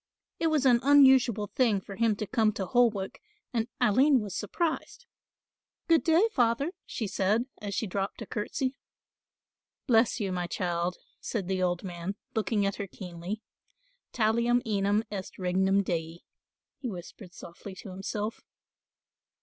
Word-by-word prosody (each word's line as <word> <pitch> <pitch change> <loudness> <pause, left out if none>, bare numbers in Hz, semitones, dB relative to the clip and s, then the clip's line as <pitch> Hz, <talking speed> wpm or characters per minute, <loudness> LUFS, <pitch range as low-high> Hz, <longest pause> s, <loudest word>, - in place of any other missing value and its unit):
It 330 - +2
was 305 -4 +2
an 245 -2 +6
unusual 265 -6 +6
thing 230 -6 +3
for 195 +1 -9
him 225 0 +2
to 215 - -3
come 215 +1 +2
to 195 -2 -3
Holwick 220 -4 +1 0.3
and 230 -1 0
Aline 255 +4 +5
was 205 -4 -5
surprised. 330 - -2 0.8
"Good 330 -1 +4
day, 340 +6 +4
Father," 245 - +2 0.2
she 225 - -3
said, 205 +4 +1 0.2
as 200 -2 -4
she - - 0
dropped 195 0 -3
a - - -9
curtsey. 255 +6 -2 1.1
"Bless 235 -1 +3
you, 200 -3 -1
my 180 -1 -2
child," 175 -1 -1 0.2
said 200 -6 -3
the 190 -1 -1
old 175 0 0
man, 180 +1 -5 0.2
looking 210 -1 +1
at 195 - -1
her 200 - -4
keenly, 180 +3 -7 0.7
"talium 235 +2 +2
enim 205 0 +1
est 195 -2 -6
regnum 190 +2 +2
dei," 165 -2 -3 0.6
he 255 - -3
whispered 180 0 -9
softly 185 +3 -10
to 195 - -9
himself. 205 +3 -4
210 Hz, 145 wpm, -29 LUFS, 190-240 Hz, 1.1 s, an